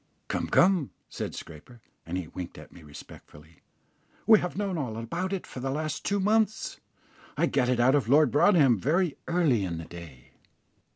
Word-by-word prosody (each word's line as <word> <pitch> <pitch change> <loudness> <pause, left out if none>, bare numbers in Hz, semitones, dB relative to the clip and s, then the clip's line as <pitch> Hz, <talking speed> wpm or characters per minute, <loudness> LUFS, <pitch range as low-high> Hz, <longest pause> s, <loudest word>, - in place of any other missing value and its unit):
"Come, - - -2
come," 180 -6 +3 0.2
said - - -5
Scraper, 85 +10 -11 0.3
and 90 +2 -3
he 90 -3 -5
winked 90 +1 -8
at - - -13
me 85 - -15
respectfully; 75 +1 -14 0.7
"we 220 -2 +7
have 180 0 -4
known 200 -2 -2
all 125 -9 -4
about 170 +12 -4
it 195 -2 -3
for - - -9
the 135 +2 -3
last 155 +3 -3
two 200 0 0
months. 215 +2 0 0.6
I - - +3
got 125 - +1
it 125 -1 +1
out 125 +2 +4
of 135 -6 +1
Lord 145 -1 +5
Broadhem 145 - +4
very 165 - +1
early 160 - +2
in 85 -3 -3
the 80 - -7
day." 80 -8 -12
135 Hz, 180 wpm, -27 LUFS, -, 0.7 s, we